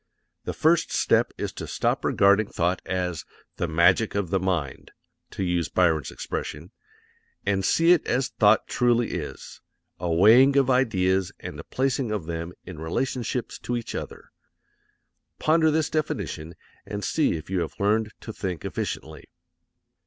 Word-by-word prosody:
The -, -, -3 dB
first 165 Hz, +2 st, +2 dB
step -, -, +2 dB
is -, -, -4 dB
to -, -, -7 dB
stop -, -, -1 dB
regarding 100 Hz, +2 st, +4 dB
thought 90 Hz, 0 st, -1 dB
as 90 Hz, -3 st, -2 dB, 0.3 s
"the 85 Hz, -, -1 dB
magic 85 Hz, +7 st, +3 dB
of 100 Hz, -4 st, -1 dB
the 95 Hz, -, +2 dB
mind," 90 Hz, -7 st, -2 dB, 0.4 s
to -, -, -4 dB
use 90 Hz, -2 st, 0 dB
Byron's 80 Hz, -4 st, +2 dB
expression, 80 Hz, +7 st, -6 dB, 0.7 s
and 95 Hz, -1 st, +1 dB
see 165 Hz, -, +4 dB
it 180 Hz, -, +3 dB
as 125 Hz, 0 st, +1 dB
thought -, -, +3 dB
truly 120 Hz, -1 st, +1 dB
is 85 Hz, -5 st, -7 dB, 0.4 s
a 90 Hz, -2 st, -2 dB
weighing 115 Hz, +11 st, +6 dB
of 135 Hz, -1 st, +4 dB
ideas 95 Hz, -7 st, +2 dB
and -, -, -8 dB
a -, -, -7 dB
placing 130 Hz, -2 st, -1 dB
of 105 Hz, -6 st, -2 dB
them 85 Hz, +1 st, -4 dB
in 90 Hz, -4 st, -9 dB
relationships 120 Hz, +8 st, -3 dB
to 120 Hz, -, -2 dB
each 115 Hz, -, -6 dB
other. -, -, -7 dB, 1.1 s
Ponder 160 Hz, 0 st, +3 dB
this 155 Hz, 0 st, 0 dB
definition 85 Hz, -, -3 dB, 0.3 s
and 105 Hz, 0 st, -6 dB
see 155 Hz, -, +1 dB
if 80 Hz, +2 st, -6 dB
you 95 Hz, -, +1 dB
have 85 Hz, -, -3 dB
learned 105 Hz, +2 st, +1 dB
to 110 Hz, -, -7 dB
think 90 Hz, -6 st, -5 dB
efficiently. 80 Hz, -2 st, -5 dB
95 Hz, 150 wpm, -25 LUFS, 85-125 Hz, 1.1 s, weighing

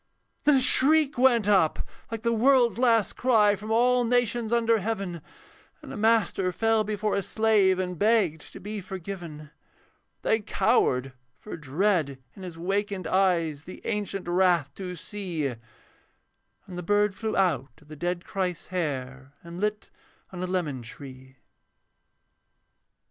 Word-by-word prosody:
Then 295 Hz, -1 st, +5 dB
a 265 Hz, -, +3 dB
shriek 295 Hz, +3 st, +5 dB
went 245 Hz, -4 st, +3 dB
up 190 Hz, -7 st, +2 dB, 0.2 s
like 225 Hz, -1 st, -6 dB
the 235 Hz, 0 st, +1 dB
world's 240 Hz, 0 st, +3 dB
last 230 Hz, -4 st, +2 dB
cry 215 Hz, -5 st, +3 dB
From 210 Hz, +2 st, -9 dB
all 245 Hz, +2 st, +3 dB
nations 240 Hz, -1 st, 0 dB
under 230 Hz, -1 st, +2 dB
heaven, 195 Hz, -5 st, -4 dB, 0.6 s
And -, -, -9 dB
a -, -, -6 dB
master 215 Hz, -4 st, +1 dB
fell 225 Hz, +4 st, +1 dB
before 210 Hz, 0 st, -2 dB
a 200 Hz, -, +1 dB
slave 205 Hz, -2 st, +2 dB
And 180 Hz, -2 st, -4 dB
begged 205 Hz, -8 st, +1 dB
to -, -, -9 dB
be 205 Hz, +2 st, -6 dB
forgiven. 175 Hz, -5 st, -8 dB, 0.7 s
They 220 Hz, -, +2 dB
cowered, 190 Hz, -, +1 dB, 0.2 s
for 210 Hz, -, -8 dB
dread 160 Hz, -1 st, 0 dB, 0.2 s
in 195 Hz, -, -12 dB
his 180 Hz, -3 st, -8 dB
wakened 195 Hz, +1 st, -2 dB
eyes 165 Hz, -5 st, +1 dB
The 185 Hz, -, -10 dB
ancient 200 Hz, -3 st, -3 dB
wrath 175 Hz, -5 st, +2 dB
to 180 Hz, 0 st, -6 dB
see; 175 Hz, -3 st, -5 dB
And 125 Hz, -4 st, -4 dB, 1.1 s
the 180 Hz, -2 st, -7 dB
bird 205 Hz, +3 st, +1 dB
flew 220 Hz, +2 st, -3 dB
out 145 Hz, -8 st, 0 dB
of 150 Hz, -, -22 dB
the 155 Hz, -, -10 dB
dead 175 Hz, +3 st, -3 dB
Christ's 180 Hz, -3 st, -3 dB
hair, 135 Hz, -5 st, -4 dB
And 170 Hz, +2 st, -9 dB
lit 210 Hz, 0 st, -2 dB, 0.4 s
on 180 Hz, -2 st, -7 dB
a 185 Hz, -, -2 dB
lemon 165 Hz, -8 st, -2 dB
tree. 130 Hz, +2 st, -12 dB
190 Hz, 145 wpm, -26 LUFS, 165-220 Hz, 1.1 s, Then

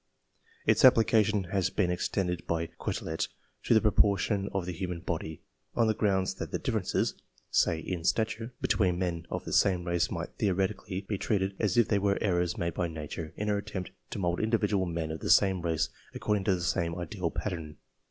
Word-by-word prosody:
Its -, -, +3 dB
application 110 Hz, -4 st, +5 dB
had 95 Hz, -2 st, +1 dB
been 90 Hz, -4 st, +2 dB
extended 90 Hz, -1 st, -1 dB
by 85 Hz, 0 st, 0 dB
Quetelet 80 Hz, 0 st, -2 dB, 0.3 s
to -, -, +3 dB
the 110 Hz, -, +6 dB
proportions 100 Hz, -1 st, +2 dB
of 95 Hz, -3 st, -2 dB
the 90 Hz, -, -3 dB
human 90 Hz, 0 st, -4 dB
body, 80 Hz, -2 st, -4 dB, 0.3 s
on 115 Hz, -, +4 dB
the 110 Hz, -, +3 dB
grounds 95 Hz, -3 st, +1 dB
that -, -, -6 dB
the -, -, 0 dB
differences, -, -, 0 dB, 0.4 s
say 80 Hz, -, +3 dB
in 85 Hz, 0 st, -4 dB
stature, 110 Hz, +4 st, 0 dB
between 90 Hz, -4 st, +2 dB
men 85 Hz, -2 st, -2 dB
of -, -, -4 dB
the -, -, -4 dB
same 90 Hz, -3 st, +3 dB
race 85 Hz, -1 st, +1 dB
might -, -, -4 dB
theoretically 95 Hz, 0 st, 0 dB
be 100 Hz, 0 st, -4 dB
treated 100 Hz, -3 st, 0 dB
as 105 Hz, -2 st, +1 dB
if 120 Hz, -, +5 dB
they 105 Hz, -, +2 dB
were 100 Hz, 0 st, +2 dB
Errors 90 Hz, -3 st, +1 dB
made 85 Hz, -1 st, -1 dB
by 90 Hz, +1 st, -1 dB
Nature 80 Hz, 0 st, -6 dB
in 105 Hz, -, -2 dB
her 105 Hz, -1 st, +1 dB
attempt 100 Hz, -3 st, -5 dB, 0.2 s
to -, -, -5 dB
mould 85 Hz, -2 st, 0 dB
individual 105 Hz, -4 st, +1 dB
men 85 Hz, -2 st, -2 dB
of 80 Hz, -, -5 dB
the -, -, -4 dB
same 95 Hz, -2 st, +5 dB
race 85 Hz, -2 st, 0 dB, 0.3 s
according 105 Hz, -2 st, 0 dB
to 95 Hz, -3 st, +3 dB
the 90 Hz, -, -4 dB
same 85 Hz, -1 st, 0 dB
ideal 90 Hz, 0 st, -3 dB
pattern. 80 Hz, -5 st, -4 dB
95 Hz, 190 wpm, -30 LUFS, 85-105 Hz, 0.4 s, the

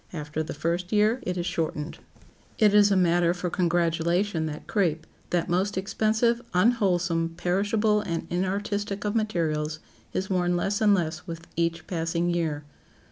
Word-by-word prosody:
After 150 Hz, -1 st, -4 dB
the 155 Hz, -, -5 dB
first 170 Hz, +4 st, -2 dB
year 215 Hz, +3 st, +3 dB
it 180 Hz, 0 st, -1 dB
is 175 Hz, -, -2 dB
shortened. 160 Hz, -2 st, -3 dB, 0.6 s
It 210 Hz, -3 st, +4 dB
is 205 Hz, 0 st, +6 dB
a 200 Hz, -, +3 dB
matter 175 Hz, -1 st, +3 dB
for 180 Hz, -1 st, -3 dB
congratulation 170 Hz, 0 st, +1 dB
that 150 Hz, -1 st, -7 dB
crape, 165 Hz, -6 st, 0 dB, 0.2 s
that 175 Hz, -1 st, 0 dB
most 185 Hz, +3 st, 0 dB
expensive, 220 Hz, +4 st, +1 dB
unwholesome, 180 Hz, -6 st, +2 dB
perishable 210 Hz, +4 st, +1 dB
and 170 Hz, -5 st, -3 dB
inartistic 200 Hz, +3 st, -2 dB
of 205 Hz, -, 0 dB
materials, 160 Hz, -8 st, 0 dB, 0.3 s
is 190 Hz, -, -2 dB
worn 180 Hz, -2 st, +1 dB
less 200 Hz, +4 st, -1 dB
and 205 Hz, -2 st, +5 dB
less 170 Hz, 0 st, -3 dB
with 165 Hz, 0 st, -7 dB
each 165 Hz, 0 st, -1 dB
passing 170 Hz, -1 st, -1 dB
year. 160 Hz, -4 st, -1 dB
175 Hz, 150 wpm, -26 LUFS, 165-205 Hz, 0.6 s, is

